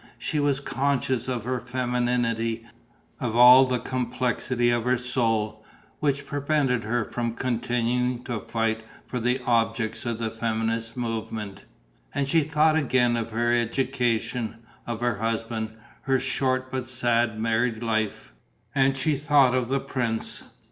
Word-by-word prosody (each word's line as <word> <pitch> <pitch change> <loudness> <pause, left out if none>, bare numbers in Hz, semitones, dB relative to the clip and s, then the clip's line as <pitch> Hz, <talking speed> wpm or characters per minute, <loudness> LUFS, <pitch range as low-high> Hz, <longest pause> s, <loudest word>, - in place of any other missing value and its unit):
She 135 +5 -2
was 145 -2 +2
conscious 135 -3 -1
of 125 -4 -2
her 125 +1 -1
femininity, 120 -2 -1 0.5
of 115 -2 -2
all 125 +2 +9
the 130 -1 0
complexity 125 0 0
of 120 -1 +1
her 125 +1 +2
soul, 115 -3 -1 0.4
which 140 -1 0
prevented 140 -4 0
her 115 0 0
from 115 0 -3
continuing 125 0 0
to 120 -4 -3
fight 115 +1 -1 0.2
for 125 - -4
the 125 +3 +1
objects 115 -1 0
of 115 -1 -1
the 110 -1 -2
feminist 115 +1 -2
movement. 110 -3 -4 0.5
And 140 -1 0
she 165 +3 +4
thought 155 +1 +3
again 130 -5 +2
of 115 -1 -2
her 120 +1 +1
education, 120 -1 0 0.3
of 120 -1 -4
her 120 -3 +1
husband, 115 0 -2 0.3
her 135 -1 +1
short 130 0 -1
but 130 -2 -3
sad 120 -3 +1
married 115 +1 0
life... 110 - -2 0.4
and 135 0 +3
she 145 +3 +2
thought 145 -3 +4
of 130 -2 +1
the 135 +1 +1
prince. 120 -4 -3
120 Hz, 140 wpm, -26 LUFS, 115-130 Hz, 0.5 s, all